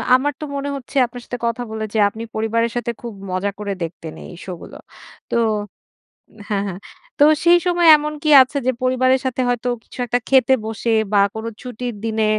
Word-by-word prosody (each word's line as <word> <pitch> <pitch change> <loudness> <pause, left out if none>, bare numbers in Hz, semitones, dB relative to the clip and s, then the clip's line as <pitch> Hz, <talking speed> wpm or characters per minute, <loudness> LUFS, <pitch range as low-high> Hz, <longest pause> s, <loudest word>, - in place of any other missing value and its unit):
আমার 285 +3 +1
তো - - -3
মনে 280 0 -3
হচ্ছে 275 +1 -10
আপনার 245 +1 -9
সাথে 245 - -5
কথা 235 +1 -1
বলে 220 0 -4
যে 220 - +1
আপনি 220 +2 -8
পরিবারের 230 +1 0
সাথে 240 -1 -1
খুব 235 -2 -6 0.2
মজা 185 +2 -1
করে 205 -1 -3
দেখতেন 165 -1 -7
এই - - -11
শো 190 - -6
গুলো। - - -11 0.6
তো - - 0 1.1
হ্যাঁ, 200 -2 0
হ্যাঁ। 185 -1 -6 0.4
তো - - +7 0.2
সেই 350 +1 +7
সময় 350 -1 +3
এমন 300 0 -4
কি 305 - +1
আছে 260 +2 0
যে - - +5
পরিবারের 255 +1 +3
সাথে 260 0 -1
হয়তো 245 0 -1
কিছু - - -15
একটা 245 +1 0
খেতে 265 -1 +5
বসে 220 +1 -3 0.2
বা 205 - +5 0.2
কোন 220 0 -5 0.2
ছুটির 245 -1 -5
দিনে 220 -1 0
240 Hz, 195 wpm, -20 LUFS, 220-260 Hz, 1.1 s, তো